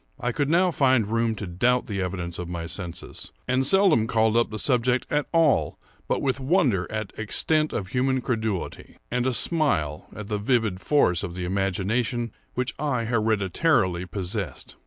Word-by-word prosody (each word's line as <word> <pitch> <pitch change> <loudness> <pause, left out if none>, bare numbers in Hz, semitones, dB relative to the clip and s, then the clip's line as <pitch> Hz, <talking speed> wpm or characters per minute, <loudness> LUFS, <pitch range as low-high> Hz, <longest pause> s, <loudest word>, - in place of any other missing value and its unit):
I 125 - -1
could 140 +3 -1
now 180 +3 +3
find 130 -7 +3
room 115 +1 0
to 105 - -5
doubt 120 +8 +1
the 100 -3 -3
evidence 90 -2 -4
of 90 -1 -5
my 85 -1 -4
senses; 85 0 -6 0.2
and 130 +1 +1
seldom 185 - +4
called 110 -1 +2
up 120 0 +3
the 110 - -5
subject 125 0 +1
at 150 0 0
all 165 -4 +2 0.3
but - - -1
with 135 -1 0
wonder 130 - +1
at 110 -1 -4
extent 155 +8 0
of 95 -4 -3
human 130 +2 +1
credulity, 110 -6 -3
and 125 +1 0
a - - +2
smile 115 - +1
at 105 -1 -7
the 105 -1 -2
vivid 110 -4 0
force 90 - +2
of 85 - -5
the 90 -1 -4
imagination 100 +5 -1 0.2
which 125 0 -1
I 135 -6 -1
hereditarily 110 - +1
possessed. 95 - -4
115 Hz, 170 wpm, -25 LUFS, 95-130 Hz, 0.3 s, seldom